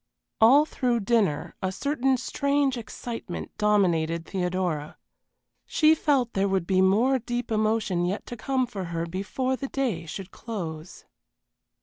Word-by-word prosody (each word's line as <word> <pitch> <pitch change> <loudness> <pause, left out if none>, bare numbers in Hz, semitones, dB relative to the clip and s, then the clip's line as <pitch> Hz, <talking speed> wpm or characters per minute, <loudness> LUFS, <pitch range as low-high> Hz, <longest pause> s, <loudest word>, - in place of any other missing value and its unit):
All 270 +7 +7
through 245 -6 0
dinner 200 -8 +1
a 185 - -1
certain 270 +4 0
strange 280 +1 0
excitement 235 0 -6
dominated 170 -6 +2
Theodora. 180 -5 -2 0.7
She 310 0 +5
felt 275 -6 +1
there 195 0 +1
would 190 -3 0
be 185 +1 +2
more 230 +8 +3
deep 240 0 -4
emotion 215 -4 +1
yet 195 +3 -3
to 240 - -7
come 260 +2 0
for 200 -6 -6
her 170 -1 -3
before 200 +9 -2
the 275 - -5
day 230 -13 -2
should 190 +4 -7
close. 175 -7 -7
215 Hz, 135 wpm, -26 LUFS, 185-255 Hz, 0.7 s, All